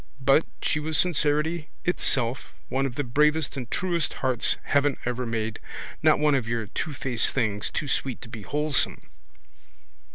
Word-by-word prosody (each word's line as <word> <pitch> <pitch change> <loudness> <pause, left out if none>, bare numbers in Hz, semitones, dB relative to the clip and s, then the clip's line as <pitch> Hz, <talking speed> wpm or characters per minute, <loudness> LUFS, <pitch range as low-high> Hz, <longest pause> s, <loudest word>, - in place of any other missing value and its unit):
But 135 +4 +4 0.2
she 150 - +1
was 155 +1 0
sincerity 155 -1 +2 0.2
itself, 130 -8 0 0.2
one 135 +1 +1
of 125 - -7
the 145 - -1
bravest 150 +5 +2
and 125 -4 -5
truest 175 -4 -1
hearts 130 -3 +1
heaven 140 -1 +2
ever 125 0 -2
made, 110 -1 -2 0.4
not - - +5
one 150 0 +3
of 130 -5 +1
your 115 -1 -1
twofaced 130 - 0
things, 105 -5 -1
too 150 - -3
sweet 135 -2 -1
to - - -9
be 115 -2 -8
wholesome. 150 +7 -1
135 Hz, 155 wpm, -26 LUFS, 120-150 Hz, 0.4 s, not